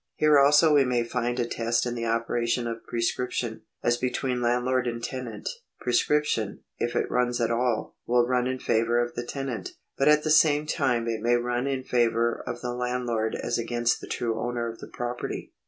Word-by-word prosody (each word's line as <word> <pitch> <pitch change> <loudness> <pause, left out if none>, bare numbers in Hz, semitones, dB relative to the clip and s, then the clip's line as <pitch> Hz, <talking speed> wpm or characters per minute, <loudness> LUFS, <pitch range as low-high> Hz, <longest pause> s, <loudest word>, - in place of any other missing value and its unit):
Here 150 -2 +5
also 145 +3 +6
we 145 -2 +6
may 125 -2 +1
find 120 +1 -2
a 120 - +1
test 115 0 0
in 120 - -2
the 115 -1 -3
operation 115 +1 0
of 115 -1 -4
prescription. 120 -1 -2 0.2
As 120 0 +2
between 125 0 -1
landlord 125 +1 +1
and 115 -1 -3
tenant, 120 -5 -5 0.3
prescription, 125 -3 0 0.2
if 120 - -1
it - - 0
runs 125 0 +1
at 115 -1 +1
all, 120 -1 0
will 120 0 +4
run 125 0 +1
in 130 0 -1
favour 115 -1 +1
of 120 0 -1
the 120 - -4
tenant; 135 -4 -4 0.3
but 135 - +3
at 150 0 +5
the 155 - 0
same 155 -1 +5
time 130 -7 0
it 115 -1 -2
may 120 +1 +3
run 120 +2 -1
in 135 -2 -2
favour 115 -1 +1
of 120 - -4
the 120 0 -3
landlord 125 -3 -1
as - - -2
against 120 0 0
the - - -8
true 115 -2 -2
owner 120 0 -2
of 115 0 -7
the - - -9
property. 120 0 -5
120 Hz, 195 wpm, -26 LUFS, 115-125 Hz, 0.3 s, also